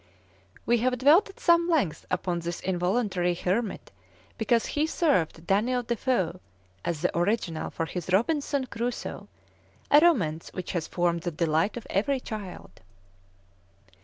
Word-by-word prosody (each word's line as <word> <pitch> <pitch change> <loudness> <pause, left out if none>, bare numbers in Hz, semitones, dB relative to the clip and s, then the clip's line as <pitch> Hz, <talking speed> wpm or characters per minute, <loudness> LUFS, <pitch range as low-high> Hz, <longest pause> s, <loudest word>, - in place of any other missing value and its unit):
We 240 0 +3
have 250 +2 +1
dwelt 300 - +5
at 390 - -14
some 340 0 +4
length 280 - 0
upon 180 -1 -1
this 170 +1 -4
involuntary 180 -1 0
hermit 195 +5 -2 0.4
because 230 +1 +1
he 300 +1 0
served 185 - 0
Daniel 240 +7 +1
de 235 0 -1
Foe 185 -9 0 0.4
as 170 -3 -2
the 180 - 0
original 175 -2 0
of 165 0 -2
his 180 0 -4
"Robinson 280 - +1
Crusoe," 240 0 -4 0.6
a 290 - +9
romance 185 - +2
which 185 - -5
has 170 -3 -2
formed 175 -1 0
the 175 - -2
delight 165 +5 0
of 235 - -7
every 265 +8 +1
child. 205 - -8
200 Hz, 140 wpm, -27 LUFS, 175-255 Hz, 0.6 s, a